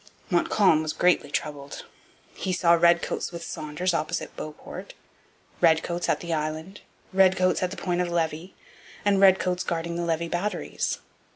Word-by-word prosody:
Montcalm 175 -1 +3
was 155 -1 -2
greatly 175 -5 +2
troubled. 145 -1 -5 0.5
He 185 - -3
saw 170 -1 +4
redcoats 170 +1 +2
with 170 -1 -7
Saunders 160 +4 -3
opposite 165 +1 -2
Beauport, 155 0 -8 0.7
redcoats 170 +1 +2
at - - +1
the 170 -1 -3
island, 160 +5 -4 0.3
redcoats 185 -1 +4
at 185 - +1
the 195 - -8
Point 180 -1 -1
of 180 - -1
Levy, 165 +1 -2 0.5
and 200 -1 +3
redcoats 185 -2 +4
guarding 170 0 -3
the 175 - -2
Levis 170 0 -1
batteries. 180 +5 -2
170 Hz, 145 wpm, -26 LUFS, 160-185 Hz, 0.7 s, saw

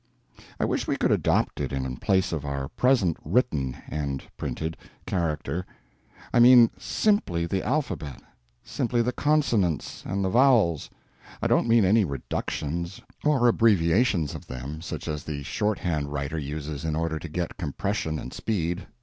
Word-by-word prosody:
I - - +2
wish - - -1
we - - 0
could - - +1
adopt - - +1
it - - -2
in 65 -1 -3
place 95 -1 +1
of 80 -4 -2
our 70 -1 -3
present 105 - +2
written 70 - 0
(and 70 -3 -3
printed) 80 +1 -4 0.3
character. 85 -1 -2 0.7
I 120 - +4
mean 120 -1 +8
_simply 90 - +1
_the 95 +2 -1
alphabet; 125 - -2 0.4
simply 120 0 0
the 125 - 0
consonants 120 - +1
and 100 +1 -2
the - - +1
vowels—I 115 - +1
don't - - +3
mean 115 -3 +5
any 105 +4 +4
_reductions 85 +3 -3 0.2
_or 140 -5 +4
abbreviations 100 - +3
of - - -9
them, 65 +5 -6
such 85 - -6
as 75 -2 -3
the 70 -2 -5
shorthand 85 -6 -1
writer 75 +3 -3
uses 75 0 -5
in 80 -1 -1
order 80 0 -1
to 85 - -7
get 85 +2 -3
compression 80 -1 -2
and 65 - -7
speed. 90 -4 -2
85 Hz, 150 wpm, -26 LUFS, 75-110 Hz, 0.7 s, mean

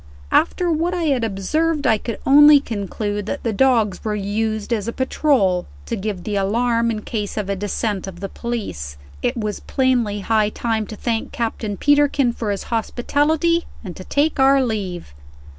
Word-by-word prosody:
After 350 +1 +2
what 335 +3 0
I 350 - -1
had 275 -6 +1
observed, 285 - 0
I 220 -3 +3
could 230 0 -5
only 295 +1 +8
conclude 205 -3 -4
that 285 - -4
the 230 - -1
dogs 225 -3 +2
were 215 -1 -1
used 215 +2 -2
as 215 -2 -2
a - - -1
patrol, 260 - +1 0.2
to - - -3
give 195 -2 -4
the 210 - -3
alarm 230 +4 +1
in 215 -2 -3
case 210 -3 -4
of 200 -2 -2
a - - 0
descent 205 0 -2
of 180 -2 -8
the 195 - -4
police. 90 - -5 0.2
It - - -1
was 210 -2 -3
plainly 245 -6 0
high 215 0 +2
time 220 -1 -2
to 215 - -7
thank 225 +1 -2
Captain 220 -3 -3
Peterkin 290 -3 +3
for 225 -3 -4
his 200 -1 -2
hospitality, 295 +9 +1 0.2
and 185 -5 -7
to 185 - -9
take 290 +7 0
our 270 0 +5
leave. 190 - -4
225 Hz, 175 wpm, -20 LUFS, 205-270 Hz, 0.2 s, only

